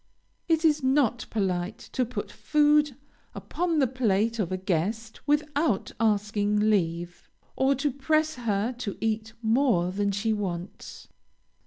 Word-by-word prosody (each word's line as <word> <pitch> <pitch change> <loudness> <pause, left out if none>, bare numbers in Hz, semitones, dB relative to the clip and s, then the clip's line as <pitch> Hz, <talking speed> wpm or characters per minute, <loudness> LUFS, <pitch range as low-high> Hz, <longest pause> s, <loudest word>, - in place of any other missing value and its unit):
It 325 -1 +2
is 300 -1 +3
not 260 -3 +1
polite 190 -1 -1 0.2
to 255 - +1
put 250 +2 -5
food 295 -2 +2 0.4
upon 340 -2 -2
the 280 - +4
plate 230 -3 0
of 190 -4 -1
a 185 - -1
guest 200 +5 -2
without 295 -5 +1
asking 210 -1 +1
leave, 175 -3 -2 0.3
or 270 +1 +2
to 275 +2 0
press 310 +4 +1
her 230 -2 -1
to 210 -5 -4
eat 220 0 -2
more 225 -6 +2
than 200 +1 0
she 210 +3 0
wants. 185 -3 -6
225 Hz, 135 wpm, -27 LUFS, 200-275 Hz, 0.4 s, the